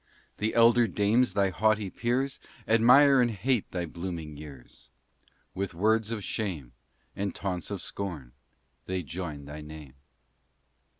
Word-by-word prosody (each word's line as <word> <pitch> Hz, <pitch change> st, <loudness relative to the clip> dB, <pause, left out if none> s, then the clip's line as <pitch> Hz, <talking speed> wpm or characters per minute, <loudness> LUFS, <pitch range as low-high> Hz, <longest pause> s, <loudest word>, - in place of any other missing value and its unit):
The 110 Hz, +1 st, -1 dB
elder 115 Hz, 0 st, +6 dB
dames, 110 Hz, +5 st, +2 dB
thy 100 Hz, -2 st, +2 dB
haughty 105 Hz, 0 st, +1 dB
peers, 130 Hz, +4 st, -1 dB, 0.3 s
Admire 125 Hz, +5 st, +6 dB
and 120 Hz, -, +3 dB
hate 115 Hz, +2 st, -1 dB
thy 90 Hz, -2 st, -3 dB
blooming 85 Hz, -2 st, -6 dB
years. 70 Hz, -4 st, -12 dB, 0.6 s
With 95 Hz, -2 st, -4 dB
words 110 Hz, +4 st, +2 dB
of 110 Hz, -3 st, -4 dB
shame 85 Hz, -, -3 dB, 0.4 s
And 100 Hz, 0 st, -3 dB
taunts 90 Hz, -3 st, -4 dB
of 100 Hz, -3 st, -5 dB
scorn 80 Hz, -11 st, -6 dB, 0.6 s
they 95 Hz, -1 st, -2 dB
join 75 Hz, -2 st, -6 dB
thy 75 Hz, +2 st, -8 dB
name. 75 Hz, -3 st, -10 dB
100 Hz, 130 wpm, -28 LUFS, 80-115 Hz, 0.6 s, elder